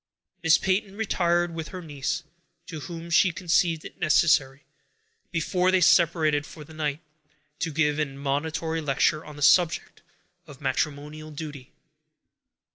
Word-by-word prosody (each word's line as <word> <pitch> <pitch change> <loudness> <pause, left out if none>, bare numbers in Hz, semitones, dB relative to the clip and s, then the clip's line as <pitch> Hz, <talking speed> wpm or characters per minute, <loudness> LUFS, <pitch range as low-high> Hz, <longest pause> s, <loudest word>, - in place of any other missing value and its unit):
Miss 165 -2 +5
Peyton 195 +1 -1
retired 175 -5 +1
with 160 -1 -5
her 185 - -8
niece, 145 +1 -3 0.4
to 160 -3 -7
whom 170 +2 -8
she 175 +2 +5
conceived 170 -2 +1
it - - -11
necessary, 150 -3 +3 0.7
before 180 +2 0
they 190 0 +4
separated 160 -3 +3
for 155 0 -11
the 155 +2 -14
night, 155 -1 -3 0.6
to 165 - -2
give 150 0 +1
an 150 -2 0
admonitory 160 +4 -2
lecture 150 +1 +1
on 150 - -11
the 145 - -5
subject 170 +3 +3 0.5
of 140 -3 -12
matrimonial 150 +3 -3
duty. 145 -3 -8
160 Hz, 135 wpm, -26 LUFS, 145-170 Hz, 0.7 s, Miss